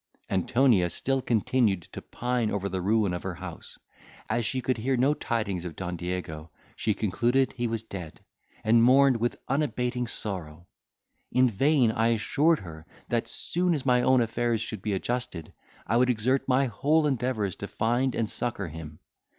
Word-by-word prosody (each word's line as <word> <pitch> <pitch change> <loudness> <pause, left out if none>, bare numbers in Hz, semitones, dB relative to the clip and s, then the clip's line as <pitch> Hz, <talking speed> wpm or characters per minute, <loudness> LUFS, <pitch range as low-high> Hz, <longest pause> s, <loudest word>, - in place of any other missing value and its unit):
Antonia 100 0 +3
still 135 +10 -1
continued 110 -5 +1
to - - -7
pine 120 -2 -1
over 100 -1 -2
the 95 -1 -3
ruin 105 0 +2
of 90 - -3
her 95 -2 -4
house; 90 -1 -9 0.5
as 120 +1 +1
she 130 - -1
could 130 -1 -1
hear 130 +3 0
no 135 +4 +3
tidings 105 - -2
of 85 -2 -6
Don 90 -2 -4
Diego, 85 -3 -5 0.3
she 110 - 0
concluded 120 +6 +1
he 120 -1 -2
was 115 -1 -2
dead, 90 -7 -8 0.4
and 115 +1 +5
mourned 130 +1 +5
with 120 +1 -1
unabating 125 -3 -1
sorrow. 85 -7 -5 0.7
In 125 -1 +4
vain 135 +1 +3
I 115 +1 +1
assured 145 +8 +2
her, 80 -2 -10 0.2
that, 120 -1 0
soon 175 0 0
as 140 - -4
my 125 -1 +4
own 130 0 +4
affairs 115 0 0
should 110 -2 -5
be 105 0 -2
adjusted, 120 -4 -3 0.3
I 115 - +1
would 125 +1 +3
exert 125 +3 +1
my 135 +1 +3
whole 150 +7 +2
endeavours 125 - -1
to 100 - -5
find 120 +5 0
and 115 - 0
succour 110 -5 -3
him. 75 -1 -9
115 Hz, 170 wpm, -27 LUFS, 95-125 Hz, 0.7 s, and